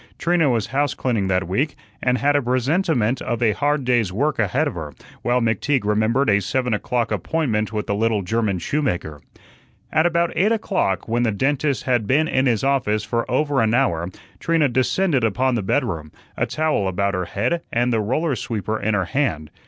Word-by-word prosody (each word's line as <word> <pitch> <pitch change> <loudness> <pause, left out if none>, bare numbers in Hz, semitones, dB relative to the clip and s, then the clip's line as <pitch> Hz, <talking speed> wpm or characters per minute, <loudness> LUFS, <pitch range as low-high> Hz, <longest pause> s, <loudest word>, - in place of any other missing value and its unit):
Trina 170 -4 +2
was 115 -5 +1
house 145 -1 +1
cleaning 115 -7 -1
that 95 -2 0
week 130 - -1 0.3
and 125 0 +2
had 145 +5 +2
a 145 - +3
presentiment 130 - +1
of 120 - -2
a 110 - +4
hard 145 +5 0
day's 120 -6 +2
work 140 +9 -1
ahead 125 +9 +1
of 140 - -3
her, 75 -5 -7 0.3
while 125 +1 +1
McTeague 115 +3 0
remembered 110 +6 +2
a 100 -1 +3
seven 125 +5 -1
o'clock 120 +3 -1
appointment 115 -11 -1
with 105 -1 -3
a - - 0
little 110 -1 0
German 105 0 0
shoemaker. 85 - -2 0.7
At 160 +2 +3
about 170 0 0
eight 195 +7 +3
o'clock, 195 - 0
when 115 +1 0
the 115 -2 +2
dentist 140 +5 0
had 120 -5 0
been 150 +6 +3
in 130 -2 +1
his 115 -4 +1
office 125 -6 +1
for 115 +1 -2
over 145 +1 +1
an 110 +1 +2
hour, 85 -10 +1 0.3
Trina 165 -4 +2
descended 130 +3 +1
upon 125 +4 +1
the 115 - 0
bedroom, 95 - -1 0.2
a - - -1
towel 155 -11 0
about 100 +2 0
her 90 -1 -1
head 115 - -1
and 120 +1 +1
the 115 - +2
roller 135 +7 0
sweeper 110 -2 -3
in 105 +1 0
her 95 -2 0
hand. 85 - -1
120 Hz, 190 wpm, -21 LUFS, 105-145 Hz, 0.7 s, a